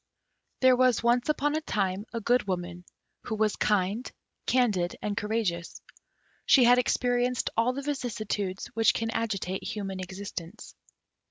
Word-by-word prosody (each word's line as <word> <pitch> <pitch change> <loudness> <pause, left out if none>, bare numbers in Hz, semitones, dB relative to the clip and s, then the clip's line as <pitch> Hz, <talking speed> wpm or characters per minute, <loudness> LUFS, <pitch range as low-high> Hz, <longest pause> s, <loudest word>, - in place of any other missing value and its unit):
There 260 -1 +6
was 250 -3 +3
once 240 +3 +2
upon 295 -1 +1
a 310 - 0
time 200 -6 -2
a 230 - -3
Good 245 +1 +1
Woman, 175 -1 -4 0.4
who 220 - -2
was 215 -1 +1
kind, 210 +4 0 0.4
candid, 210 -9 +1
and 205 -1 -3
courageous. 205 -6 -2 0.7
She 265 - +7
had 245 +1 +6
experienced 245 0 +1
all 230 +3 +2
the 280 +2 -5
vicissitudes 215 -8 -3
which 225 0 +3
can 225 0 -1
agitate 200 -5 -2
human 195 -3 -4
existence. 190 +1 -7
220 Hz, 140 wpm, -28 LUFS, 190-245 Hz, 0.7 s, She